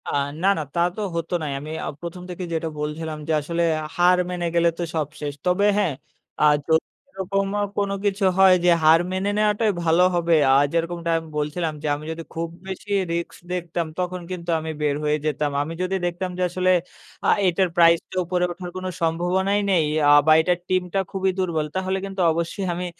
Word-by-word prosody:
আ - - -2 0.3
না, - - +4
না, - - -1
তা - - -1 0.2
তো 215 - -4
হতো 165 +1 -3
নাই, 150 -2 -3
আমি 150 +2 -8
আ - - -4
১ম 175 +1 -7
থেকেই 180 0 -5
যেটা 160 0 -1
বলছিলাম 155 +1 -4
যে, - - -1
আসলে 170 +3 -2 0.3
হার 180 +1 +4
মেনে 175 -1 -3
গেলে 170 0 +4
তো 175 - -2
সব 155 -3 0
শেষ, 145 -1 -3
তবে 180 +3 +2
হ্যাঁ, 195 -7 +1 0.5
আ - - +4 0.2
যদি 160 0 +3 0.3
এরকম 195 +1 -1
আ - - +1 0.2
কোনো 200 -1 0
কিছু 200 0 0
হয় 190 -1 +7
যে, - - +6
হার 160 +2 +6
মেনে 190 +2 -1
নেওয়াটাই 210 +1 +2
ভালো 165 +2 +4
হবে, 170 -1 +3 0.2
আ - - +6 0.2
যেরকমটা 170 0 -1
আমি 165 0 -6
বলছিলাম 155 +2 -2
যে, - - -1
আমি 150 +1 -9
যদি 165 +1 -6
খুব 165 +1 -2 0.2
বেশি 190 +2 -7 0.2
রিস্ক 170 0 -3
দেখতাম, 175 -1 -2
তখন 180 0 -2
কিন্তু 175 -1 -6
আমি 160 0 -4
বের 145 -1 +1
হয়ে 150 0 +1
যেতাম, 150 -1 0
আমি 155 +3 -4
যদি 185 +1 -1
দেখতাম 175 +1 -2
যে, - - -3
আসলে 185 +1 0 0.6
আ - - +3 0.2
এটার 185 +1 +2
প্রাইস 170 -1 +6
টা - - -6
উপরে 180 +1 0
ওঠার 180 0 -7
কোন 185 - -5 0.2
সম্ভাবনাই 180 +5 +1
নেই। 170 -5 +3 0.2
আ - - +7 0.2
বা 155 - +8
এটার 175 +1 +1
টিমটা 185 0 0
খুবই 190 0 0
দুর্বল। 170 -5 0
তাহলে 190 0 -1
কিন্তু 195 -1 -4
অবশ্যই 170 +5 -2
আমি 180 +1 -4
175 Hz, 200 wpm, -23 LUFS, 160-185 Hz, 0.6 s, বা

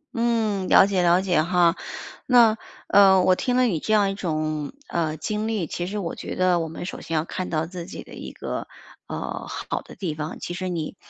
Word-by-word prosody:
嗯， 225 -5 0
了 - - +8
解 195 -2 +1
了 175 +1 +4
解 175 -5 +2
哈。 175 0 +3 0.5
那， 235 -3 +6 0.3
呃， 190 -2 +6
我 185 - +5
听 250 +5 -1
了 255 - +4
你 185 -10 +1
这 215 - -1
样 200 -2 +4
一 - - -3
种， 155 -5 -2 0.2
呃， 160 -2 -1
经 215 +7 -2
历， 215 -7 -1
其 175 +3 -4
实 210 +2 -4
我 175 -5 -3
觉 - - -6
得 180 -1 +3
我 165 - -2
们 165 +2 -7
首 - - -6
先 165 - -4
要 155 +1 +1
看 185 - -4
到 160 -1 0
自 175 0 -7
己 - - -8
的 - - -14
一 - - -8
个， - - -5 0.4
呃， - - -5
好 - - -4
的 - - -13
地 175 -6 -3
方， 150 +1 -5
其 175 - -5
实 185 0 -3
你， 165 -3 -3
180 Hz, 240 characters per minute, -24 LUFS, 165-200 Hz, 0.5 s, 了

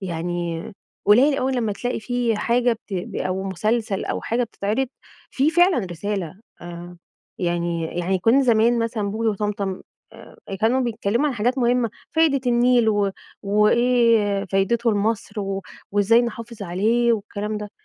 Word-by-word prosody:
يعني 170 -2 -3 0.4
قليل 265 +7 +5
أوي 265 +1 0
لمّا 230 -4 0
تلاقي 245 +3 -3
في 240 -1 -1
حاجة 240 +2 +2 0.2
بت 180 -2 -4
أو 185 +1 -2
مسلسل 210 +2 -1
أو - - -3
حاجة 240 +2 -1
بتتعرض، 220 +4 -2 0.4
فيه 275 +3 +2
فعلًا 350 0 +4
رسالة. 190 0 -4 0.2
آآ، 175 0 -9 0.4
يعني 170 -1 -1
يعني 185 +2 0
كنّا 230 +9 +4
زمان 235 -1 +3
مثلًا 230 -3 -1
بوجي 225 +2 -1
وطمطم 205 -2 -2 0.3
آآ - - -14 0.2
كانوا 240 +4 +2
بيتكلّموا 235 +2 0
عن 275 - -3
حاجات 245 +4 0
مهمة، 240 -1 +2 0.2
فايدة 320 -4 +3
النيل 240 -1 +3
و 205 -2 +2 0.3
وإيه 210 0 +3
فايدته 210 +5 +1
لمصر، 215 +1 -1
و 195 -1 -3 0.3
وإزاي 205 +4 +4
نحافظ 230 -2 -6
عليه 220 +6 +1
والكلام 210 0 -3
ده. 210 -1 -7
220 Hz, 140 wpm, -22 LUFS, 195-240 Hz, 0.4 s, قليل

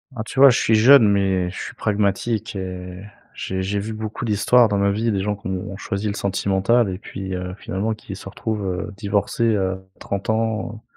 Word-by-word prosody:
Ah 110 - -4
tu 125 - -5
vois, 140 0 +10
je 120 - +3
suis 110 - +3
jeune, 115 +1 +7
mais 95 -3 +1
je 95 - -9
suis - - -7
pragmatique 105 +1 -1
et 90 -1 -6 0.3
j'ai 95 0 -4
j'ai 100 +2 -1
vu 110 +2 -4
beaucoup 110 +2 -5
d'histoires 115 +2 +4
dans 100 - 0
ma 100 0 +2
vie, 110 +2 0
des 95 -2 0
gens 105 0 -1
qui 100 - -9
ont 95 +2 -4
choisi 105 0 -3
le 100 - -1
sentimental 100 +3 +1
et 90 - -7
puis, 95 -2 -6
heu, 90 0 -4
finalement 105 +4 -2
qui 100 -2 -9
se 95 - -9
retrouvent, 105 -1 -3
heu, 95 +3 -3
divorcés, 100 +5 -1
heu, 95 -1 -1 0.2
30 100 +3 -4
ans, 110 0 -1
100 Hz, 210 wpm, -22 LUFS, 95-110 Hz, 0.3 s, vois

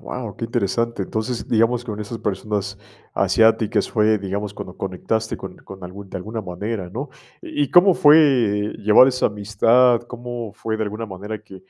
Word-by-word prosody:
guau, 115 -5 -6
qué 115 - -4
interesante, 115 +1 -1
entonces, 110 +5 -3
digamos, 115 +2 +1
con 105 -3 -6
esas 105 +2 -5
personas 100 -1 -3 0.3
asiáticas 110 +2 +2
fue, 110 0 +3
digamos, 100 +1 -4
cuando 90 - -8
conectaste 110 +4 -3
con - - -9
con 95 -2 -11
algún 95 +2 -10
de - - -6
alguna 110 +5 -5
manera, 95 +1 -5
¿no? 130 +11 -6 0.3
¿Y 145 - -1
y - - -9
cómo 180 +2 +7
fue 125 -9 +4
llevar 110 +5 +6
esa 125 -1 +1
amistad?, 115 +4 +3
¿cómo 120 -2 -6
fue, 110 -1 -3
de 110 - 0
alguna 105 +2 -5
manera, 105 +2 -7
que, 95 -3 -13
110 Hz, 170 wpm, -21 LUFS, 100-115 Hz, 0.3 s, cómo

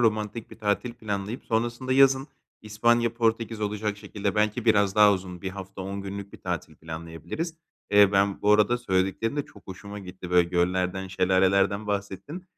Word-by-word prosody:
romantik 110 0 0
bir - - -13
tatil 110 +3 -1
planlayıp 105 +1 -4
sonrasında 120 +3 -1
yazın 135 0 +5 0.4
İspanya, 115 +2 +2
Portekiz 115 -1 0
olacak 105 0 -2
şekilde 100 -1 -3
belki 105 +2 +1
biraz 100 -4 +3
daha 105 -1 +7
uzun 90 -1 -5
1 95 - -2
hafta, 95 0 -8
10 100 +1 -5
günlük 100 0 -7
bir - - -12
tatil 85 -3 -4
planlayabiliriz. 80 - -6 0.4
Eee, 100 -1 +6
ben 100 0 +2
bu 105 - +5
arada 105 +3 +4
söylediklerin 95 +3 0
de 145 - -1
çok 100 - -18
hoşuma 100 +2 -8
gitti. 90 -2 -9
Böyle 90 -1 +4
göllerden, 90 +1 0
şelalelerden 95 +2 +2
bahsettin. 100 - -4
100 Hz, 160 wpm, -26 LUFS, 95-110 Hz, 0.4 s, daha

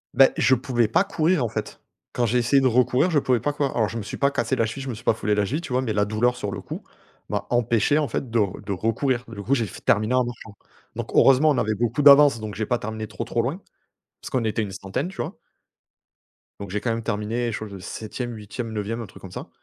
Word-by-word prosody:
Beh, 135 +1 +7
je 130 - +4
pouvais 120 -3 0
pas 115 - +3
courir, 175 -5 +1
en 115 - -2
fait. 110 -1 -5 0.3
Quand 120 - +1
j'ai 120 +2 +2
essayé 135 +3 +3
de 130 - +4
recourir, 125 +7 +3
je 150 - +4
pouvais 125 -3 +1
pas 145 - -1
courir. 140 -2 -1
Alors, 110 -3 +2
je 115 - -5
me - - -3
suis - - -6
pas 140 0 +2
cassé 135 - 0
la 115 - +1
cheville, 115 +5 -5
je 135 - -5
me 120 - -3
suis 110 - -12
pas - - +3
foulé 105 -1 0
la 105 - +1
cheville, 145 - -2
tu 155 - -8
vois? 130 - +2
Mais 115 -4 -1
la 105 -1 +2
douleur, 115 +4 +1
sur 105 - -4
le - - -5
coup, - - -7 0.5
m'a - - -2
empêché, 120 +4 +2
en 150 - 0
fait, 125 +1 -3
de 115 - +2
r 100 -3 0
de 100 - -6
recourir. 120 +5 0
Du 105 -3 -8
coup, 130 - +1
j'ai 115 -5 +1
f - - -11
terminé 110 +4 +3
en 125 -1 +3
marchant. 115 -3 -9 0.4
Donc - - -5
heureusement, 135 +3 +6
on 145 - 0
avait 110 0 0
beaucoup 120 +5 0
d'avance 140 -3 +7
donc 110 -1 -6
j'ai 110 - -2
pas 120 +2 0
terminé 110 0 -5
trop, - - -5
trop 120 - -1
loin. 155 +11 -3 0.6
Parce - - -7
qu'on 130 -3 0
était 110 0 0
une 100 - -4
centaine, 100 - -3
tu 190 0 -11
vois? - - -6 1.2
Donc 100 -2 -7
j'ai 105 +1 -2
quand 120 - -1
même 115 0 -3
terminé 115 +2 -2
chose 110 -1 -5
de 100 - -8
7e-8e-9e, 110 +1 -5
un - - -5
truc 95 - -15
comme 95 - -10
ça. - - -8
115 Hz, 265 wpm, -24 LUFS, 105-130 Hz, 1.2 s, Beh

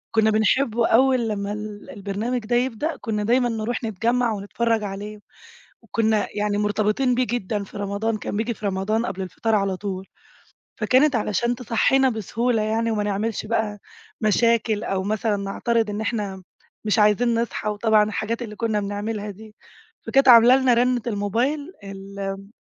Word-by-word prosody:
كنّا 220 -1 +4
بنحبه 225 +2 +2
أول 255 -1 +3
لمّا 200 -1 -3
ال 210 -1 -7
البرنامج 210 +5 -3
ده 240 +2 0
يبدأ 260 +6 0
كنّا 210 -2 -2
دايمًا 245 +2 +2
نروح 225 +1 -3
نتجمّع 230 +3 0
ونتفرّج 220 +2 -1
عليه، 205 +1 -6 0.6
وكنّا 220 -2 +1
يعني 205 0 0
مرتبطين 215 +5 +1
بيه 250 +1 +1
جدًا 210 -3 -2
في 200 - -13
رمضان 205 +2 -2
كان 205 - -4
بييجي 230 +2 -1
في 210 - -6
رمضان 200 +4 0
قبل 190 0 -4
الفطار 220 +4 -2
على 195 -2 +1
طول، 190 -1 -5 0.7
فكانت 255 +6 +3
علشان 235 +2 0
تصحينا 255 +3 +2
بسهولة 230 +1 -1
يعني 225 +2 0
وما 210 -1 0
نعملش 210 +2 -2
بقى 215 -2 -1 0.4
مشاكل 220 0 +2
أو 195 -4 -1
مثلًا 215 +1 0
نعترض 220 +3 -1
إن 210 +1 -3
إحنا 205 -4 -3 0.4
مش 215 +1 +2
عايزين 215 +3 +3
نصحى 230 -2 -3
وطبعًا 210 0 +3
الحاجات 220 +2 -3
اللي 215 -3 -6
كنّا 220 -1 0
بنعملها 205 +1 -4
دي، 215 +2 -14 0.5
فكانت 275 -1 +3
عاملة 240 +1 +9
لنا 260 -2 +3
رنّة 245 +1 +2
الموبايل 240 - -1
الم 195 0 -7
220 Hz, 155 wpm, -23 LUFS, 205-235 Hz, 0.7 s, عاملة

